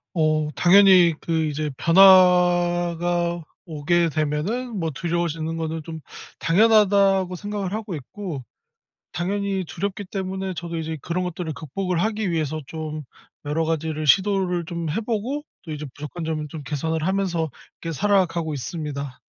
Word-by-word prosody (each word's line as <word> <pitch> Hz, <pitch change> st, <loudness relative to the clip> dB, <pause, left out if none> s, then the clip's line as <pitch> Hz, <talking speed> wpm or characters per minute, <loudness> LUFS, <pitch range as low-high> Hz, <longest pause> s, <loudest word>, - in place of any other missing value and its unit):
어 155 Hz, -1 st, +2 dB
당연히 185 Hz, -2 st, +6 dB
그 160 Hz, -1 st, 0 dB
이제 150 Hz, 0 st, -2 dB
변화가 175 Hz, -2 st, +4 dB, 0.2 s
오게 165 Hz, +1 st, +1 dB
되면은 180 Hz, -, -2 dB
뭐 165 Hz, -1 st, -1 dB
두려워지는 165 Hz, 0 st, -2 dB
거는 160 Hz, -1 st, -3 dB
좀 160 Hz, 0 st, -7 dB, 0.4 s
당연하다고 195 Hz, -1 st, +4 dB
생각을 205 Hz, 0 st, -4 dB
하고 215 Hz, -3 st, -4 dB
있고 150 Hz, 0 st, -7 dB, 0.7 s
당연히 195 Hz, +2 st, -2 dB
두렵기 200 Hz, +3 st, -4 dB
때문에 190 Hz, 0 st, -4 dB
저도 170 Hz, 0 st, -5 dB
이제 160 Hz, 0 st, -4 dB
그런 180 Hz, +2 st, -2 dB
것들을 175 Hz, -2 st, -4 dB
극복을 175 Hz, +3 st, -3 dB
하기 215 Hz, 0 st, -1 dB
위해서 155 Hz, -2 st, -1 dB
좀 155 Hz, -1 st, -5 dB, 0.4 s
여러 155 Hz, +3 st, 0 dB
가지를 160 Hz, -1 st, -2 dB
시도를 190 Hz, 0 st, +3 dB
좀 170 Hz, -1 st, -4 dB
해 220 Hz, -, -1 dB
보고 235 Hz, +6 st, -2 dB, 0.2 s
또 160 Hz, -, -6 dB
이제 150 Hz, 0 st, -5 dB
부족한 150 Hz, +3 st, -6 dB
점을 155 Hz, -1 st, -2 dB
좀 150 Hz, +1 st, -8 dB
개선을 160 Hz, +2 st, -2 dB
하면서 185 Hz, -4 st, 0 dB, 0.3 s
이렇게 165 Hz, -, -3 dB
살아가고 175 Hz, -4 st, +1 dB
있습니다. 140 Hz, -1 st, -5 dB
170 Hz, 315 characters per minute, -23 LUFS, 160-190 Hz, 0.7 s, 당연히